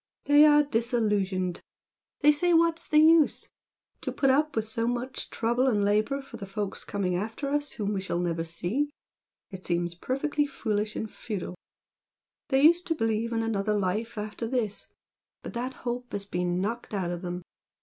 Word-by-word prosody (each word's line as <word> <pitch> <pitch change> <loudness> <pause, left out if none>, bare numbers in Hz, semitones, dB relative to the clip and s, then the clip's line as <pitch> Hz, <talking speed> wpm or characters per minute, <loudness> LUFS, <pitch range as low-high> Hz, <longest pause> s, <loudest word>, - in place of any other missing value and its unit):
They 290 +1 +7
are 295 0 +6
'disillusioned.' 210 -8 0 0.6
They 295 - +7
say 345 +4 +2
'what's 335 0 +2
the 305 - +2
use?' 315 0 +5 0.5
To - - -3
put 270 -2 +2
up 300 +3 +2
with 220 -1 -1
so 230 +1 -1
much 245 +2 -3
trouble 240 +3 +1
and 210 -5 +2
labour 215 +7 +1
for 270 - -10
the 195 - -7
folks 200 0 -4
coming 185 -3 -1
after 225 +9 -3
us 290 0 -1
whom 210 -2 -2
we 195 - -1
shall 185 -2 -2
never 170 -2 -1
see, 175 - -2 0.6
it 190 -1 -8
seems 175 0 -1
perfectly 285 - -1
foolish 215 -6 -2
and 220 - -3
futile. 210 -4 -5 1.0
They 270 0 +3
used 340 +3 +5
to 325 - +1
believe 225 -2 0
in 225 -1 0
another 210 -1 0
life 210 +4 -2
after 210 +2 -4
this 225 -5 -2 0.6
but - - -7
that 250 +2 -3
hope 245 0 -3
has 200 -1 -3
been 180 -2 -1
knocked 220 +2 -3
out 180 -3 -1
of 175 -1 -4
them. 180 -1 -5
225 Hz, 175 wpm, -28 LUFS, 195-270 Hz, 1.0 s, They